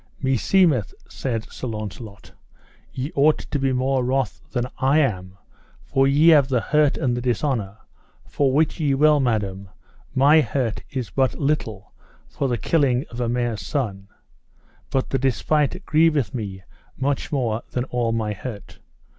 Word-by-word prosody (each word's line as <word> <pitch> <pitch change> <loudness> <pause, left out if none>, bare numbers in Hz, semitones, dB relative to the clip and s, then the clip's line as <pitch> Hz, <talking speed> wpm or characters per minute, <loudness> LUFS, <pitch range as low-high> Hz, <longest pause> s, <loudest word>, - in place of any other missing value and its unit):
Meseemeth, 135 - +2
said 115 -4 -4
Sir 130 - -6
Launcelot, 105 -1 -7 0.6
ye 135 +3 -4
ought 150 +2 +4
to 145 - -4
be 135 0 +1
more 130 0 +1
wroth 130 +1 -1
than 120 0 -1
I 135 +3 +3
am, 95 -10 -1 0.5
for 135 0 +2
ye 145 +4 +5
have 145 -5 +6
the 130 -3 +1
hurt 150 +3 +2
and 125 -2 0
the 120 - -3
dishonour, 120 -5 -1 0.5
for 140 -2 +1
wit 155 +5 +1
ye 145 -3 +1
well, 150 +1 +4
madam, 100 -6 -1 0.5
my 145 +4 +6
hurt 125 -6 -2
is 130 -4 -4
but 130 -1 +1
little 115 -9 -2 0.3
for 85 - -2
the 120 -2 0
killing 135 -2 +1
of 120 +1 -5
a 120 - 0
mare's 120 -4 -1
son, 100 -2 -3 0.8
but 135 - -1
the 135 - +1
despite 150 +6 0
grieveth 155 -8 +2
me 100 -5 -5 0.3
much 135 +1 -2
more 120 -6 -1
than 125 - -2
all 120 -3 -1
my 110 -2 -1
hurt. 105 -1 -9
130 Hz, 155 wpm, -22 LUFS, 115-140 Hz, 0.8 s, have